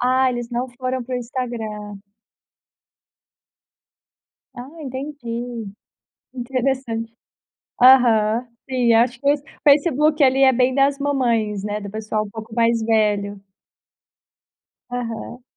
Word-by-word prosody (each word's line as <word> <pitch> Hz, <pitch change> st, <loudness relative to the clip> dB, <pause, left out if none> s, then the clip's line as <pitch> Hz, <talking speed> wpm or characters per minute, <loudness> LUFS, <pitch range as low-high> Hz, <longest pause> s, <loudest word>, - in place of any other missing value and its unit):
Ah, 255 Hz, +1 st, +3 dB
eles 240 Hz, -1 st, -5 dB
não 245 Hz, +2 st, -2 dB
foram 255 Hz, +1 st, -4 dB
para 255 Hz, +1 st, -5 dB
o -, -, -2 dB
Instagram. 225 Hz, -4 st, -5 dB, 2.6 s
Ah, 245 Hz, +2 st, -8 dB
entendi, 245 Hz, -4 st, -6 dB, 0.7 s
interessante. 245 Hz, -2 st, -2 dB, 0.7 s
Aham, 240 Hz, -2 st, +5 dB, 0.2 s
sim 250 Hz, -3 st, +2 dB
acho 235 Hz, +2 st, +2 dB
que 280 Hz, +2 st, +3 dB
o -, -, -1 dB, 0.3 s
Facebook 300 Hz, +1 st, +4 dB
ali 270 Hz, 0 st, +4 dB
é 265 Hz, -1 st, +6 dB
bem 255 Hz, +1 st, +2 dB
das 275 Hz, +1 st, +2 dB
mamães, 235 Hz, -8 st, 0 dB
né, 210 Hz, +1 st, -4 dB
do 200 Hz, -, -7 dB
pessoal 215 Hz, 0 st, -2 dB
um -, -, -10 dB
pouco 220 Hz, +1 st, -9 dB
mais 230 Hz, -1 st, +2 dB
velho. 210 Hz, -2 st, +1 dB, 1.5 s
Aham. 245 Hz, 0 st, -5 dB
245 Hz, 110 wpm, -21 LUFS, 225-260 Hz, 2.6 s, é